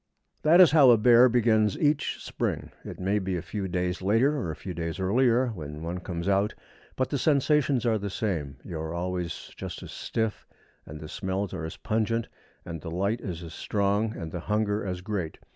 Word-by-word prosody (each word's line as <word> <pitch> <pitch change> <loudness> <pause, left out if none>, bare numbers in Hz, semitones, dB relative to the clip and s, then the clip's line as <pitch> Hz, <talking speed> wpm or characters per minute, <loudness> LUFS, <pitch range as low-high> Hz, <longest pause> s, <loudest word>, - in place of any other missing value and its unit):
That 165 +4 +5
is 180 -6 +8
how 145 -4 +7
a 120 - +7
bear 120 +3 +6
begins 110 -4 +3
each 150 0 0
spring. - - -3
It - - -8
may 100 +3 +1
be 95 -1 -2
a - - -3
few 100 +2 -4
days 90 0 -2
later 115 +10 +3
or 125 - -2
a 80 - -4
few 95 - -7
days 85 +1 -4
earlier 120 +6 +3
when 75 -7 -7
one 85 +2 -3
comes 85 0 -5
out; 100 +1 +2 0.4
but 130 - -1
the 140 - 0
sensations 140 -3 +2
are 110 -2 +2
the 100 0 -4
same. 85 -9 -3
You 80 - -6
are 80 +1 -4
always 90 -1 -4
just - - -7
as - - -9
stiff, 110 -2 -3 0.4
and 75 +1 -8
the 75 - -8
smells 95 +3 -3
are 85 -4 -4
as 80 - -7
pungent, 115 +1 -1 0.4
and 85 -2 -6
the 80 - -6
light 100 +7 -1
is 90 -3 -5
as 80 -1 -8
strong, 105 +2 0
and 80 -3 -6
the 90 - -4
hunger 105 +2 0
as 90 -2 -4
great. 95 -5 -3
100 Hz, 205 wpm, -27 LUFS, 90-115 Hz, 0.4 s, is